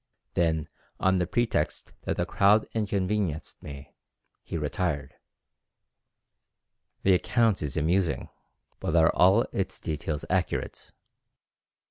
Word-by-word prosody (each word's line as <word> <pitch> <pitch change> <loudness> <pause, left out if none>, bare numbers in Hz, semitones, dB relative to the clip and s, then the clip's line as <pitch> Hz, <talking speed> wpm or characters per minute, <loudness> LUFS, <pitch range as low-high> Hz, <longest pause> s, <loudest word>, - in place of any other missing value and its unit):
Then 80 -3 +1 0.3
on 95 0 +3
the 90 - 0
pretext 120 +4 -1
that - - -1
the - - +1
crowd 105 +2 +4
inconvenienced 100 -6 -1
me, 70 -1 -10 0.5
he - - -5
retired." 75 -2 -2 1.9
The 95 - +5
account 115 +3 +2
is 75 -3 -3
amusing, 85 +2 +1 0.5
but 80 - -1
are 80 0 +6
all 95 +6 +5
its 95 - -3
details 75 -1 -3
accurate? 90 -1 -2
90 Hz, 105 wpm, -27 LUFS, 80-100 Hz, 1.9 s, are